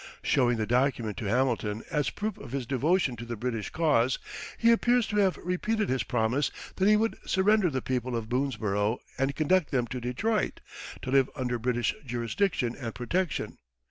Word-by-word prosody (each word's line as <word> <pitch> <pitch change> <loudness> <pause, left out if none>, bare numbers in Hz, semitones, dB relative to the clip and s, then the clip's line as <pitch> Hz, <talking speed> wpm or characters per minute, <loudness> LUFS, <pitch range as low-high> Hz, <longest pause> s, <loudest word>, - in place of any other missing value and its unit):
Showing 120 -2 +3
the 110 - 0
document 120 -3 +1
to - - -4
Hamilton 115 -2 0
as 150 -3 +1
proof 215 +1 -3
of 130 - -9
his 135 -3 -2
devotion 140 +2 +1
to 115 - -6
the 120 0 -5
British 115 -1 -3
cause, 140 -7 +2 0.4
he 230 0 +5
appears 240 0 +3
to 210 - -3
have 195 -3 +3
repeated 210 +4 -1
his 130 -1 +1
promise 120 +5 +1 0.3
that 190 - +3
he 215 - +6
would 225 +1 0
surrender 195 0 +3
the 130 -4 -3
people 125 -1 -1
of 115 -2 -3
Boonesborough 110 -4 0 0.2
and 135 +1 +1
conduct 160 +1 +2
them 125 -3 +1
to 125 +1 -5
Detroit, 195 - -1 0.4
to 130 - -3
live 135 -1 +4
under 125 -3 -2
British 120 -1 0
jurisdiction 120 - -1
and 115 -5 -6
protection. 170 +8 -2
130 Hz, 175 wpm, -28 LUFS, 120-180 Hz, 0.4 s, he